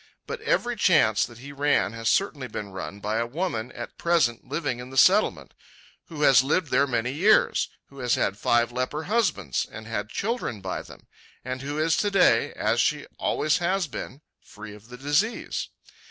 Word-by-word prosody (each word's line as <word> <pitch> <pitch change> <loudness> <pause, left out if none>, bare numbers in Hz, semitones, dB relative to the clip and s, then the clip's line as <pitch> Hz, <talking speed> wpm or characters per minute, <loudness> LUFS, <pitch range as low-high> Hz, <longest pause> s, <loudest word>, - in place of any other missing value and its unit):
But 470 -1 -6
every 245 - 0
chance 155 - +3
that 120 -2 -14
he 140 +4 -10
ran 145 -6 +1
has 115 -1 -1
certainly 150 -9 0
been 105 -3 -6
run 95 +1 -7
by 105 +2 -1
a 115 +1 0
woman 130 -5 -3
at 120 - -8
present 165 -9 +1
living 145 -4 -2
in 125 +1 -8
the 135 - -8
Settlement; 190 - +4 0.5
who 155 -3 -5
has 135 -2 +7
lived 150 +3 0
there 140 +2 +3
many 120 -1 -1
years; 195 +10 +3 0.2
who 140 - -14
has 125 -2 +1
had 100 - 0
five 120 +3 +2
leper 130 +5 -3
husbands, 180 - 0
and 110 0 -9
had 105 -2 -4
children 220 - -3
by 95 -1 -4
them; - - -14 0.4
and 130 0 -4
who 145 +2 -4
is 160 +1 +2
to 205 - +1
day, 195 -2 +4
as - - +1
she - - 0
always 155 0 +1
has 185 +2 0
been, 140 -1 -8 0.2
free 105 0 -11
of 105 +1 -15
the 125 - -9
disease. 145 - -1
135 Hz, 185 wpm, -25 LUFS, 115-170 Hz, 0.5 s, has